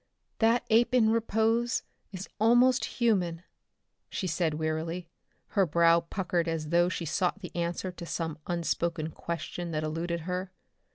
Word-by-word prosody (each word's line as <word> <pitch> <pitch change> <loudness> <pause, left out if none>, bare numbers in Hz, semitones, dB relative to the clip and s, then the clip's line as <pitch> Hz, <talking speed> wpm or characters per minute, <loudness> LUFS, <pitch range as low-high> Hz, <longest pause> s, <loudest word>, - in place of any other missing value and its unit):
"That 230 +2 +3
ape 235 +2 +4
in 220 -3 +5
repose 230 +1 +1 0.3
is 190 0 -6
almost 245 +3 +5
human," 180 -8 0 0.7
she - - -3
said 165 -2 0
wearily, 160 +3 -2 0.4
her 195 -3 +2
brow 170 +1 +5
puckered 175 0 -2
as 160 -2 -2
though 175 +1 +4
she 175 - -3
sought 180 +5 0
the 180 -4 -9
answer 175 +2 -2
to 175 -1 -9
some 160 -3 -3
unspoken 170 -2 -1
question 170 +2 -5
that 155 0 -1
eluded 165 +2 -2
her. 180 +2 -3
175 Hz, 145 wpm, -29 LUFS, 165-210 Hz, 0.7 s, in